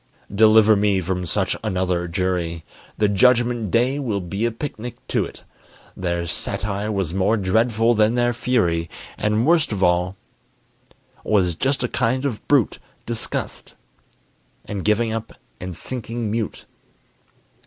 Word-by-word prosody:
Deliver 110 +1 +6
me 100 -1 +2
from 90 0 -2
such - - 0
another 90 -4 0
jury! 85 -2 -2 0.3
The 105 - +3
Judgment 120 +1 +3
day 125 +7 +2
will 115 -8 -1
be 100 +5 -3
a - - -2
picnic 120 -1 -6
to't. - - -2 0.5
Their 85 -1 -2
satire 100 +4 -3
was 95 -5 -2
more 100 +4 +2
dreadful 115 +4 +2
than 110 +1 +3
their 120 0 +2
fury, 85 -10 0 0.3
And 105 +2 +1
worst 160 -2 +3
of 100 -3 -1
all 90 +1 +2 1.1
was 95 -5 +2
just 130 - 0
a - - +1
kind 125 +3 0
of 115 -6 -4
brute 140 -7 +2 0.3
Disgust, 115 -1 -4 0.9
and 100 -3 -4
giving 110 +1 +2
up, 115 0 -5 0.3
and 90 -1 -6
sinking 120 -3 -4
mute. 110 -1 -3
105 Hz, 130 wpm, -22 LUFS, 95-120 Hz, 1.1 s, Deliver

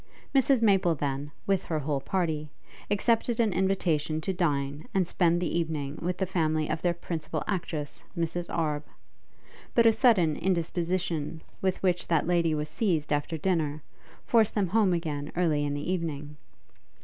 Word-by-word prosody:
Mrs 270 -3 +4
Maple 190 -5 +4
then, 140 0 -2 0.2
with 195 -1 +1
her 160 - -1
whole 145 -2 -1
party, 160 -5 -1 0.4
accepted 230 +3 +1
an 220 -4 +3
invitation 175 -5 +1
to 190 - -1
dine 145 -4 -1
and 190 -2 +3
spend 170 0 +2
the 175 -2 -1
evening 155 -3 -3
with 180 +1 -1
the 190 - 0
family 155 -4 0
of - - -2
their 175 -1 +1
principal 160 -2 -4
actress, 165 -6 -3
Miss 165 -1 -1
Arbe; 150 -3 -1 0.9
but 235 - +5
a 225 - +7
sudden 185 - +4
indisposition 170 -2 -1 0.2
with 190 0 -1
which 180 -2 +1
that 165 -3 +2
lady 170 -2 +2
was 150 0 -2
seized 155 -3 0
after 145 +3 -1
dinner, 155 -3 0 0.4
forced 225 -3 +3
them 200 -4 +1
home 210 -1 +3
again 155 -4 -2
early 160 -4 +2
in 145 0 -1
the 145 +5 -2
evening. 150 -4 -4
170 Hz, 160 wpm, -28 LUFS, 150-190 Hz, 0.9 s, a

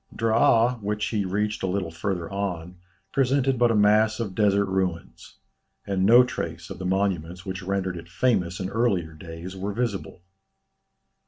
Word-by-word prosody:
Draa 115 +1 +3
which 105 +1 -2
he 105 -3 -1
reached 105 +3 -1
a 95 - -1
little 90 -2 -2
farther 85 0 -3
on, 90 -3 -4 0.3
presented 135 -1 +1
but 120 -1 +4
a 115 - +2
mass 105 +1 +4
of 105 -5 -3
desert 100 -1 +3
ruins; 95 -3 -3 0.5
and 95 -1 +1
no 120 +3 +8
trace 85 -7 -5
of 95 - -7
the 95 - -3
monuments 90 -2 -1
which 95 -1 -5
rendered 95 -1 -2
it 85 0 -10
famous 90 -5 0
in 95 0 -4
earlier 100 -8 0
days, 85 +3 -9
were 100 +2 -4
visible. 100 -6 -3
100 Hz, 160 wpm, -25 LUFS, 90-110 Hz, 0.5 s, no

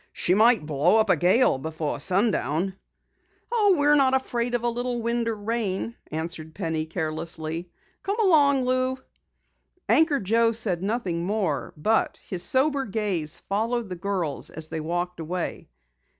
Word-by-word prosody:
She 180 - +1
might 220 -4 +4
blow 155 +7 +2
up 220 -3 +3
a - - +5
gale 185 - +3
before 155 0 -4
sundown." 190 - 0 0.8
"Oh, 420 -5 +4
we're 290 0 +4
not 270 -2 +4
afraid 245 -2 -1
of 240 - -2
a - - +1
little 245 +1 -2
wind 235 0 -1
or 225 - -1
rain," 215 0 -3 0.2
answered 160 0 -5
Penny 160 -4 -2
carelessly. 160 +1 -3 0.3
"Come 405 +3 -3
along, 285 - +4
Lou." 255 +1 0 0.9
Anchor 310 -3 +3
Joe 230 +3 +2
said 200 -6 +1
nothing 195 -5 -2
more, 180 - -1
but 220 +9 +1
his 180 -3 -2
sober 270 +6 +2
gaze 195 -8 -2
followed 225 +2 -2
the 180 - -4
girls 175 -4 -2
as 155 0 -3
they 160 -1 -4
walked 175 +2 -3
away. 170 +2 -4
200 Hz, 150 wpm, -25 LUFS, 170-240 Hz, 0.9 s, a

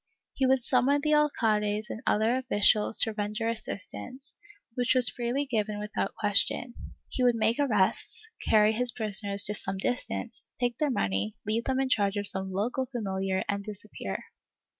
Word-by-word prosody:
He 265 - +1
would 260 -1 +2
summon 280 +4 +2
the 305 +1 +1
alcades 215 -8 +1
and 225 - -6
other 220 +3 +2
officials 215 -4 +3
to 225 - +3
render 210 +2 -3
assistance, 230 - -5 0.4
which 245 +1 +1
was 250 -2 +8
freely 245 +4 -2
given 215 -5 -1
without 210 +1 -3
question; 215 +3 +1 0.3
he 255 - -1
would 245 -1 +4
make 225 +3 +1
arrests, 245 - +1 0.2
carry 215 -1 +5
his 245 +2 0
prisoners 200 -3 0
to 210 - +2
some 195 -1 -2
distance, 240 +1 -3
take 245 -1 -1
their 300 - +1
money, 100 - -1
leave 220 +3 -1
them 265 0 0
in 270 - +1
charge 205 -4 +1
of 205 - -1
some 190 -1 +1
local 240 +7 -1
familiar 195 -6 -2
and 200 0 -2
disappear. 205 - -6
220 Hz, 160 wpm, -28 LUFS, 205-250 Hz, 0.4 s, was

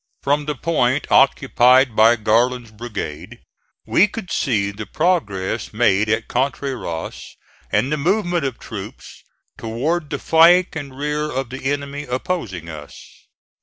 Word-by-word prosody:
From 145 +1 +1
the 150 0 -2
point 135 -2 0
occupied 130 -2 +4
by 115 +2 +6
Garland's 120 +2 +1
brigade 105 -3 -7 0.5
we 205 - +4
could 205 -2 -8
see 105 -7 0
the 105 +1 -8
progress 115 - -1
made 105 -2 +2
at 110 +1 0
Contreras 130 -9 -4 0.3
and 135 - +1
the 150 - +1
movement 175 +1 0
of 130 -3 -3
troops 105 -3 -9 0.4
toward 145 +8 -2
the 145 - -2
flank 170 +4 +4
and 140 -4 -7
rear 150 +1 -2
of 130 -2 -3
the 130 0 -8
enemy 145 +1 -3
opposing 125 - -4
us. 75 -3 -9
130 Hz, 130 wpm, -20 LUFS, 110-150 Hz, 0.5 s, by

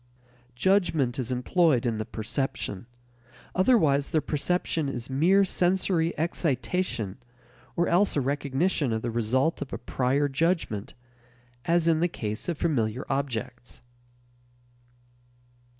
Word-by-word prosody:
Judgment 155 -5 +2
is 130 0 -2
employed 130 +1 +2
in 115 -2 -1
the 110 - -2
perception; 110 -3 -3 0.7
otherwise 160 - +3
the 160 - +2
perception 155 0 -1
is 125 -1 -5
mere 185 +9 +4
sensory 180 -2 +1
excitation 135 - -1 0.6
or 175 - +1
else 190 +4 +3
a - - +2
recognition 140 +2 0
of 110 - -2
the 120 - -2
result 125 +8 0
of 140 - -5
a - - -3
prior 130 +3 0
judgment, 140 - -1 0.7
as 170 0 +2
in 160 -1 +3
the 175 - +3
case 110 -4 -5
of 170 - -2
familiar 125 -7 -1
objects. 125 -2 -4
140 Hz, 120 wpm, -27 LUFS, 120-170 Hz, 0.7 s, mere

